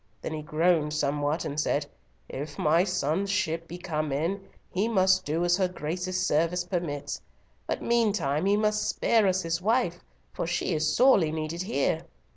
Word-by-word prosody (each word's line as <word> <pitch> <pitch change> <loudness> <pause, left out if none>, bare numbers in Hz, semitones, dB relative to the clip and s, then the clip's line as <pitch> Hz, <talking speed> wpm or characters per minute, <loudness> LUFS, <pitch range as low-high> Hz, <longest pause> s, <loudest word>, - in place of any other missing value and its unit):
then - - -3
he 155 - -4
groaned 155 0 +1
somewhat, 145 +1 0
and 145 +1 -3
said, - - 0 0.4
'If 145 +2 -6
my 160 +3 +3
son's 180 0 -1
ship 165 -4 -1
be 175 - -7
come 155 -4 -3
in, 165 +8 -1 0.3
he 195 +4 0
must 190 -4 +3
do 165 +4 0
as 175 0 +3
her 190 -2 +2
Grace's 180 +2 -3
service 170 +3 +1
permits, 170 -5 -3 0.5
but - - -2
meantime 195 -9 +1
he 200 +1 +4
must 215 0 +1
spare 225 -3 +2
us 190 0 +1
his 165 +1 -1
wife, 210 -4 +1 0.3
for - - -3
she 175 +1 -1
is 155 -1 +1
sorely 220 -11 +5
needed 160 +2 -3
here.' 195 +5 0
175 Hz, 170 wpm, -27 LUFS, 155-190 Hz, 0.5 s, sorely